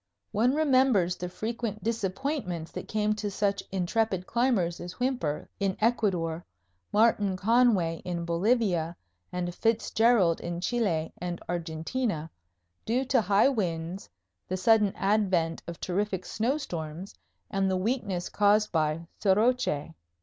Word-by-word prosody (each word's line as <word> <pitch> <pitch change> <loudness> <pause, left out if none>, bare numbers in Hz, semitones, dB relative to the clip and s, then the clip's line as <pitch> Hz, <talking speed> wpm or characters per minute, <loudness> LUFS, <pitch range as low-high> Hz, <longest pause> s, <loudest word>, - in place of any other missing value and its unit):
One 240 +6 +2
remembers 255 - +3
the 180 0 -5
frequent 220 +1 -4
disappointments 200 - -2
that - - -7
came 215 0 +1
to 210 -1 -3
such 200 0 0
intrepid 190 +1 0
climbers 230 -9 +1
as 175 +1 -7
Whymper 245 - -2
in 195 -2 0
Ecuador, 185 -8 +1 0.5
Martin 205 -3 +3
Conway 205 -6 +3
in 170 -1 -3
Bolivia 175 -2 +1 0.4
and 175 -1 -3
Fitzgerald 225 -4 +2
in 170 0 -4
Chile 180 -7 0
and 175 0 -4
Argentina, 165 +2 -2 0.5
due 250 +4 0
to 255 -2 +3
high 205 +5 +4
winds, 175 -6 -3 0.4
the 185 - -2
sudden 210 +1 +4
advent 190 -5 +1
of 170 -1 -7
terrific 190 0 -2
snowstorms 190 - -3 0.4
and 195 0 +1
the 190 - +1
weakness 200 -3 -1
caused 210 +1 +3
by 160 0 0
soroche. 205 - +2
195 Hz, 120 wpm, -28 LUFS, 175-225 Hz, 0.5 s, high